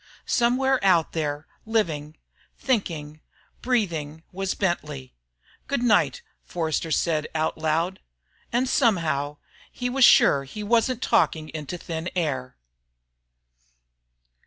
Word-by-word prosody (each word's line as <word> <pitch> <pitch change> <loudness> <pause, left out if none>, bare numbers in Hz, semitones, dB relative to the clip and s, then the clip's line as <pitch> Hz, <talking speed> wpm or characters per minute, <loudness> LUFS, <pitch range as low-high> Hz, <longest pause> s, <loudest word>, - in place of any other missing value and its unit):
Somewhere 255 +2 +2
out 175 -5 +3
there, 150 -2 -3 0.2
living, 160 -9 -1 0.4
thinking, 160 - -2 0.4
breathing 165 - -1
was 195 0 -2
Bentley. 150 -8 -3 0.5
"Good 280 -3 -1
night," 245 - +2 0.2
Forster 165 -1 -2
said 155 0 0
out 155 0 0
loud. 160 +4 -1 0.5
And 245 +2 +1
somehow, 165 - +1 0.3
he 245 -1 -3
was 270 +1 +2
sure 140 - +6
he 210 +10 -7
wasn't 235 +3 +1
talking 155 -1 +1
into 155 +2 -6
thin 165 0 -5
air. 135 -7 -2
170 Hz, 105 wpm, -25 LUFS, 155-230 Hz, 0.5 s, sure